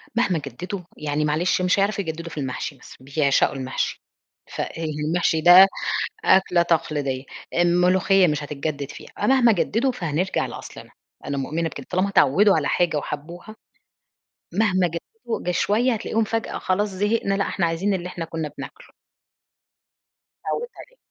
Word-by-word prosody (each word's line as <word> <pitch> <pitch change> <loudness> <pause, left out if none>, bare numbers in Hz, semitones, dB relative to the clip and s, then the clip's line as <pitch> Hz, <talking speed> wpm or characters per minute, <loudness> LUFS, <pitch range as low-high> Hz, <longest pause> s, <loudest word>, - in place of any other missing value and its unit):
مهما 200 -8 +2
جددوا 170 - -6 0.2
يعني 150 0 -1
معلش 165 +5 +1
مش 180 +2 +2
هيعرفوا 200 +1 +1
يجددوا 165 0 -6
في - - -10
المحشي 135 +2 -4
بس - - -14
بيعشقوا 140 +1 +1
المحشي، 130 -1 -3 0.5
فالمحشي 160 +1 -1
ده 180 +3 +9 0.6
أكلة 180 -2 +4
تقليدية، 145 -5 -1 0.3
الملوخية 180 +2 +4
مش 150 -1 -1
هتتجدد 145 -1 -4
فيها - - -11
أ - - 0
مهما 255 -3 +5
جددوا، 235 +5 +1
فهنرجع 175 -2 -1
لأصلنا، - - -10 0.4
أنا 140 - -2
مؤمنة 160 +5 -2
بكده، 140 -3 -9
طالما 185 +2 +1
اتعودوا 195 +2 +4
على 150 - 0
حاجة 175 -3 +1
وحبوها، 170 +9 -6 1.0
مهما 185 -3 +2
جددوا 230 - -6
ده 180 - -1
شوية 225 +7 +2
هتلاقي 215 - -5
هُم 225 - +4
فجأة 225 +1 -3
خلاص 205 +3 0
زهقنا، 205 +1 0
لأ 200 - 0
إحنا 175 - 0
عايزين 170 +5 0
اللي 180 -1 -3
إحنا 175 -2 -5
كنا 160 -2 -4
بناكله. - - -9 1.6
اتعودت 480 +1 -2
عليها. - - -14
175 Hz, 145 wpm, -23 LUFS, 150-200 Hz, 1.6 s, ده